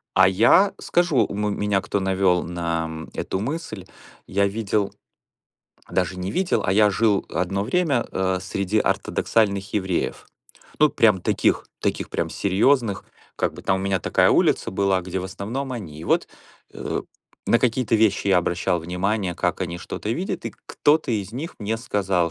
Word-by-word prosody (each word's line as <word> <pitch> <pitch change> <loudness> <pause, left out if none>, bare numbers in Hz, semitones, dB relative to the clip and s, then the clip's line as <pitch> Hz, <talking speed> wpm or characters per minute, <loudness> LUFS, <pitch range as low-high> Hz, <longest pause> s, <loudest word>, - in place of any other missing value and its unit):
А - - +7
я 115 - +5
скажу, 175 -5 +1
у - - -7
м 105 0 -1
меня 105 -1 +1
кто 100 0 -2
навёл 95 -2 +2
на 85 -1 -2
м 80 0 -7
эту 95 - -3
мысль. 115 - -4 0.4
Я 100 +1 +2
видел 105 -1 -1 1.0
даже 90 0 0
не 90 +1 -3
видел, 180 - 0
а 90 - +2
я 105 +1 +5
жил 105 0 +1
одно 95 +2 -1
время, 140 0 +1
э, 95 0 0
среди 100 +2 -1
ортодоксальных 100 -1 0
евреев. 95 -4 -1 0.5
Ну, 150 - +6
прям 105 -7 +3
таких - - +1
таких - - -1
прям - - -2
серьёзных, 105 +2 +1 0.3
как - - 0
бы - - -10
там 95 - +1
у - - -4
меня 95 -2 0
такая - - +3
улица - - +2
была, 95 -1 +1
где 95 +1 -4
в 90 - -4
основном 110 +8 -4
они. 90 -11 -7
И - - -8
вот, - - +1 0.4
э, - - -4 0.4
на 115 - +4
какие-то 120 -1 +1
вещи 105 -2 +2
я 95 -2 +5
обращал 85 0 0
внимание, 90 +2 -1
как 90 0 -1
они 85 -2 -3
что-то 105 - -6
видят, 185 +8 -3
и - - -6
кто-то 150 -2 +2
из 105 -2 -2
них 150 +8 -5
мне 110 +1 -2
сказал, 95 -6 0
100 Hz, 170 wpm, -23 LUFS, 95-115 Hz, 1.0 s, А